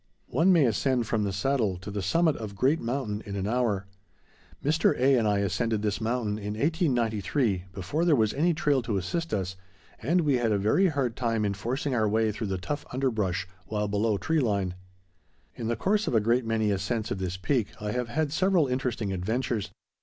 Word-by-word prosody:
One 165 +9 +4
may 165 -6 +5
ascend 125 +1 +1
from 110 -1 0
the 100 - -1
Saddle 105 -2 0
to 95 +3 -8
the 100 0 -3
summit 160 - +2
of 105 -3 -6
Great 135 +10 +2
Mountain 115 -3 -2
in 100 -2 -6
an 95 -1 -2
hour. 110 -4 0 0.8
Mr. 155 +3 +3
A. 135 +2 +4
and 115 -3 +2
I 105 -1 +2
ascended 105 +3 0
this 105 +1 -1
mountain 110 -2 -1
in 105 0 -4
1893, 120 - 0
before 95 - -2
there 170 -4 +4
was 110 -4 +2
any 165 +4 +2
trail 145 -4 +2
to 115 -4 -2
assist 165 - -2
us, 95 -2 -2 0.5
and 170 +8 +2
we 145 -5 +2
had 115 -2 +1
a 105 - +3
very 110 - +3
hard 135 -8 -1
time 115 -3 0
in 100 - 0
forcing 125 +8 -2
our 110 -3 +2
way 110 +1 +2
through 110 +1 -4
the 95 -1 -2
tough 145 +11 -4
underbrush, 105 -8 -1 0.2
while 105 -1 -1
below 105 +1 +1
tree 160 +9 0
line. 100 -8 0 0.8
In 115 -3 -5
the 115 - 0
course 205 - +1
of - - 0
a - - +6
great 115 +3 +1
many 110 -2 +1
ascents 110 +3 -2
of 95 - -2
this 90 -1 -3
peak 115 +4 0
I 105 0 -3
have 125 +1 -2
had 150 +3 -1
several 185 -2 +3
interesting 125 -6 -2
adventures. 110 +2 -1
115 Hz, 205 wpm, -27 LUFS, 105-135 Hz, 0.8 s, a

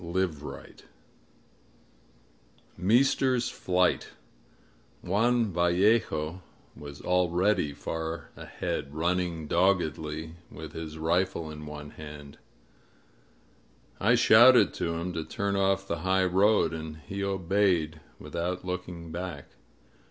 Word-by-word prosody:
CHAPTER 90 +1 0 0.4
XI - - -18 1.9
MEESTER'S 125 +4 +2
FLIGHT 90 0 0 1.0
JUAN 110 +3 +2
VALLEJO 85 -2 +2 0.3
was 70 -1 -10
already 90 -1 +2
far 80 +3 -5
ahead, 70 +1 -5
running 85 0 -1
doggedly 80 -2 0
with 80 0 -9
his 80 -1 -7
rifle 85 0 0
in 75 0 -9
one 75 0 -8
hand. 75 -2 -11 1.6
I 110 +5 +4
shouted 120 +2 +7
to 85 0 -2
him 85 +2 -3
to 80 -1 -3
turn 100 +4 -2
off 95 0 +1
the 85 - -2
high 95 +2 +2
road, 95 0 +3
and 80 -1 -6
he 100 0 -4
obeyed, 95 -4 +1 0.2
without 90 +2 -4
looking 90 -2 -5
back. 90 +2 -6
90 Hz, 100 wpm, -28 LUFS, 80-95 Hz, 1.9 s, shouted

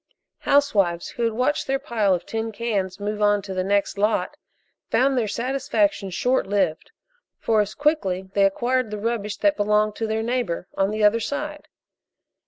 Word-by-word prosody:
Housewives 200 -12 +2
who 240 - -4
had 230 - 0
watched 255 +6 0
their 270 0 +1
pile 215 -7 +1
of 175 - -6
tin 225 0 -3
cans 200 -4 -2
move 210 +1 -3
on 205 -1 +3
to 195 -1 -6
the 185 0 -1
next 200 +1 0
lot 210 +4 +1 0.5
found 265 +4 +2
their 235 -4 +1
satisfaction 215 -4 0
short 245 +5 0
lived, 190 -6 0 0.5
for 220 -2 +2
as 210 - -4
quickly 285 - 0
they 200 -1 +4
acquired 245 +4 0
the 210 - -4
rubbish 210 -2 -2
that 305 -1 +2
belonged 210 0 +2
to 225 - -2
their 220 0 -1
neighbor 235 -7 -2
on 195 0 +1
the 215 0 -2
other 210 +2 +5
side. 300 +5 -4
215 Hz, 175 wpm, -23 LUFS, 200-245 Hz, 0.5 s, other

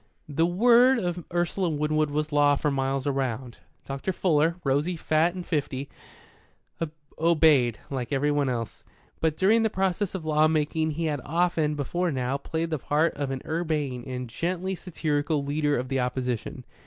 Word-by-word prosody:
The 160 +3 +1
word 240 +7 +5
of 175 -5 -2
Ursula 175 +1 0
Winwood 155 0 0
was 150 +1 -2
law 145 -1 +4
for 150 +1 0
miles 135 0 -1
around. 130 -3 -2 0.3
Dr. 135 +7 -3
Fuller, 165 -3 +2
rosy, 145 +6 +1
fat 160 +3 +1
and 180 -1 -6
fifty, 140 -4 -2 1.3
obeyed, 155 -8 +4
like 130 -2 -3
everyone 145 0 +1
else; 115 -3 -4 0.4
but 160 -1 0
during 215 +4 +4
the 220 - +2
process 190 0 -1
of 175 -4 -5
law 155 0 +4
making 155 0 0
he 160 +2 -2
had 145 -4 -1
often, 165 -1 +1
before 175 +5 -1
now, 130 -1 -1
played 160 +3 -3
the 155 - -1
part 150 +5 +1
of 145 -1 -3
an 135 -1 -4
urbane 155 -6 -2
and 125 -1 -4
gently 180 +9 -2
satirical 155 -4 -1
leader 145 0 +1
of 125 +1 -3
the 135 0 -1
opposition. 125 -2 -3
150 Hz, 160 wpm, -26 LUFS, 135-170 Hz, 1.3 s, word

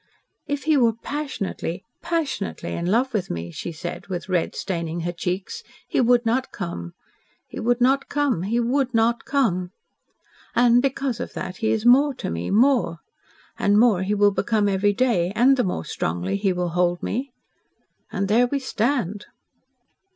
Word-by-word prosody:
"If 285 0 -2
he 310 -1 +3
were 235 -4 +4
passionately 230 - -4 0.2
passionately 310 - -2
in 170 0 -3
love 240 +6 +1
with 210 -5 -1
me," 85 0 -4
she 170 - -5
said, 170 +2 -7
with 180 -1 -5
red 180 -3 0
staining 170 -2 -3
her 175 +1 -2
cheeks, 180 +2 -4 0.3
"he - - +1
would 245 0 +3
not 255 +4 0
come 85 - -6 0.5
he - - -9
would 245 +2 +1
not 265 +3 +2
come 285 - 0
he 220 +6 0
would 255 +1 0
not 230 +1 +2
come. 210 -11 +1 0.9
And, 245 0 +5
because 270 -3 -1
of 245 - -5
that, 185 0 -5
he 220 - 0
is 220 0 0
more 270 +3 +5
to - - -4
me 85 +1 -3
MORE! 235 -5 +3 0.6
And 205 +1 +4
more 220 -6 +4
he 200 +2 0
will 205 0 +4
become 210 +1 +1
every 200 +1 +2
day 215 -7 +1
and 255 +5 +5
the 250 - +1
more 130 - -2
strongly 90 - -2
he 200 -1 +1
will 180 -1 -1
hold 175 0 0
me. 260 +4 -3 0.8
And 195 0 -1
there 235 +5 +4
we 280 - -1
stand." 230 -6 -1
220 Hz, 170 wpm, -23 LUFS, 180-250 Hz, 0.9 s, And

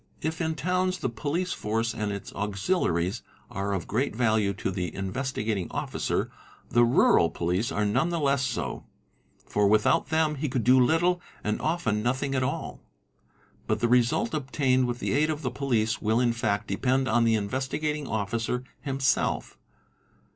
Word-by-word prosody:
| - - -33
If 160 +2 -6
in 160 -1 -1
towns 185 +4 0
the - - -2
police 150 +10 -2
force 115 +2 -1
and 105 -3 -2
its 100 -1 -6
auxiliaries 100 - 0 0.3
are 100 +1 -2
of 95 -3 -2
great 120 +3 -1
value 110 -4 +2
to 95 - -2
the 90 -3 -3
Investigating 105 - -2
Officer, - - -2 0.4
the 120 - +5
rural 115 -8 +4
police 90 - -1
are 105 - 0
none 105 +11 +1
the 170 -1 -1
less 140 -2 +2
so, 120 -4 -3 0.6
for 105 -1 +2
without 105 +4 +3
them 160 -1 +1
he 145 +1 -2
could 125 -2 -1
do 130 +3 +6
little 175 +6 +2 0.2
and 105 +1 -1
often 115 -11 0
nothing 130 +4 -1
at 130 - +1
all. 140 +6 -3 0.9
But 110 0 0
the 120 - +2
result 125 - +2
obtained 130 -3 +1
with 120 0 -2
the - - -2
aid 150 +3 +2
of 155 0 -3
the 125 - -1
police 120 -4 0
will 110 +1 +2
in 120 -2 +2
fact 110 -4 -1
depend 130 +6 0
on 115 +1 +3
the 115 -1 +3
Investigating 135 +7 -2
Officer 115 +4 -2 0.2
himself. 135 -2 0
120 Hz, 170 wpm, -27 LUFS, 105-140 Hz, 0.9 s, do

